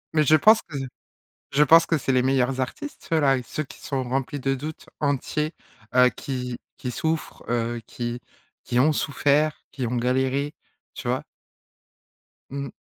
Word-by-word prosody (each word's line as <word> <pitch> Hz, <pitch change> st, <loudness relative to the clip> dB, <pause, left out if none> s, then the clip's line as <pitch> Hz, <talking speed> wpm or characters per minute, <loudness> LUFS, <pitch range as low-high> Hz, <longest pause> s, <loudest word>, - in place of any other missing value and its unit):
Mais 155 Hz, -, +5 dB
je 155 Hz, +2 st, +6 dB
pense 220 Hz, +8 st, +6 dB
que 145 Hz, -, -8 dB, 0.7 s
je 145 Hz, +2 st, +3 dB
pense 165 Hz, +4 st, +7 dB
que 165 Hz, -, +2 dB
c'est 135 Hz, -, 0 dB
les 125 Hz, -, +4 dB
meilleurs 130 Hz, 0 st, +2 dB
artistes 270 Hz, -, -5 dB
ceux 165 Hz, -, +2 dB
là. 135 Hz, -2 st, +4 dB
Ceux 155 Hz, +5 st, -4 dB
qui -, -, -14 dB
sont 135 Hz, -2 st, -2 dB
remplis 135 Hz, +3 st, -2 dB
de 135 Hz, +1 st, 0 dB
doutes, 150 Hz, +4 st, -7 dB
entiers, 150 Hz, +2 st, 0 dB, 0.4 s
heu, 125 Hz, 0 st, +8 dB
qui 125 Hz, -2 st, -4 dB, 0.2 s
qui 125 Hz, -, -4 dB
souffrent, 160 Hz, +3 st, -2 dB
heu, 120 Hz, 0 st, -1 dB
qui 120 Hz, 0 st, -4 dB, 0.4 s
qui 120 Hz, -, -1 dB
ont 150 Hz, +4 st, +5 dB
souffert, 145 Hz, +2 st, +1 dB
qui 130 Hz, -4 st, -3 dB
ont 125 Hz, -, -1 dB
galéré, 130 Hz, +4 st, 0 dB, 0.4 s
tu -, -, -5 dB
vois? -, -, 0 dB, 1.3 s
Mmh. 140 Hz, -1 st, -5 dB
135 Hz, 165 wpm, -25 LUFS, 125-150 Hz, 1.3 s, heu